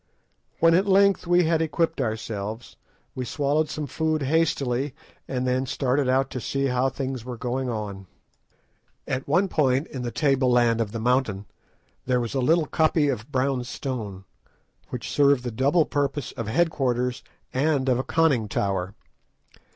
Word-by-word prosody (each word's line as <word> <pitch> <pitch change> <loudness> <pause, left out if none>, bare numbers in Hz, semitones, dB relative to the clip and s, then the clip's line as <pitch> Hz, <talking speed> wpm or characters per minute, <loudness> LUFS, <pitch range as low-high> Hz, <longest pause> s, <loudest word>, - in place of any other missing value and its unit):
When 165 0 +5
at 190 +4 +3
length 195 -2 +4
we 175 0 +4
had 165 0 +2
equipped 160 -1 0
ourselves, 110 -1 -4 0.4
we 130 - -4
swallowed 145 +4 0
some 155 - -4
food 155 0 -1
hastily, 140 -3 0 0.3
and 130 -1 -2
then 130 +1 0
started 130 +1 0
out 135 +1 +2
to 125 - -4
see 140 +3 -1
how 125 0 +1
things 130 -2 -4
were 125 -1 -6
going 125 +2 -2
on. 100 -4 -5 1.0
At 135 0 -3
one 175 +7 +3
point 135 -4 +1
in 130 - -7
the 120 - -2
table 135 -1 +2
land 120 -2 +3
of 105 -3 -2
the 115 - -4
mountain, 115 -4 0 0.6
there 125 -1 +2
was 120 0 -3
a 135 - 0
little 160 +5 +3
koppie 155 -3 +2
of 115 +3 -9
brown 130 -1 0
stone, 115 -7 -5 0.7
which 125 - -5
served 140 -3 +3
the 120 - -3
double 140 +8 +2
purpose 145 -1 -2
of 115 - -6
head 165 +9 +2
quarters 125 -3 -1 0.3
and 140 0 +1
of 125 -1 +2
a - - -1
conning 145 -6 +2
tower. 95 -1 -1
130 Hz, 165 wpm, -25 LUFS, 120-150 Hz, 1.0 s, When